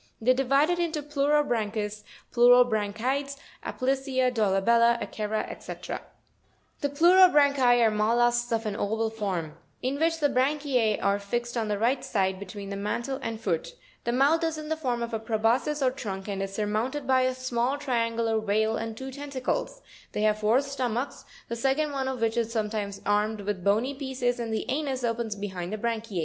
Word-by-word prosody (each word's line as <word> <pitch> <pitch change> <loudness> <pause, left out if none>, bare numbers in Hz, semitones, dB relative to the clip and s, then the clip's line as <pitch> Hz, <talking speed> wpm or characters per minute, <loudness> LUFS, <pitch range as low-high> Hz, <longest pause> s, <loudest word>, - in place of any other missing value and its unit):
They 240 +3 +3
are - - +6
divided 275 +6 +2
into 320 -3 -1
Pleurobran 280 -7 +1
chus, 210 0 -3 0.3
Pleurobranchides, 245 +3 +3 0.3
Aplysia, 260 -1 0
Dolabella, 230 +3 +3
Akera, 215 0 -3
&c. - - -8
37. - - -6 0.8
The 285 - -1
PLEUROBRANCHI 285 -6 +5
are 220 - +3
mol 215 +2 +1
lusks 240 0 +2
of 225 0 0
an 210 -2 -2
oval 220 +2 -1
form; 190 -8 -4 0.2
in 265 +3 -1
which 325 0 +1
the 295 - +3
branchie 265 -4 +1
are 200 0 +2
fixed 240 +4 -3
on 225 -2 -1
the 210 -1 -1
right 240 +5 +1
side, 190 -4 0
between 200 0 -7
the - - -3
mantle 235 +7 -3
and 225 -3 -4
foot 175 -7 -1
(fig. 170 - -11
80). - - -31 0.3
The 235 - +1
mouth 290 +6 +3
is 325 -1 -1
in 305 0 -7
the 315 - +1
form 250 -6 -2
of 235 0 -5
a 225 - -1
preboscis 235 +6 +1
or 255 - +3
trunk, 195 -7 -6
and 195 -1 -3
is 195 0 -3
surmounted 220 +7 -1
by 260 0 +3
a 255 0 +1
small 255 +1 -1
triangular 230 -4 0
veil, 220 +1 +1
and 225 0 -5
two 265 +2 -6
tentacles; 290 - -3 0.3
they 210 - -1
have 215 0 +2
four 220 +5 +3
stomachs, 260 -2 -3 0.2
the 235 - -3
second 270 +5 0
one 270 -2 -2
of 260 -3 -3
which 225 0 +1
is 230 -1 0
sometimes 210 -3 -3
armed 210 +1 +1
with 200 -2 -3
bony 220 +8 +2
pieces, 260 -3 -2
and 230 -1 -3
the 220 - -2
anus 270 -2 -2
opens 230 -2 -1
behind 190 -3 -5
the 215 - -2
branchiz. 225 -3 -3
235 Hz, 190 wpm, -27 LUFS, 215-270 Hz, 0.8 s, are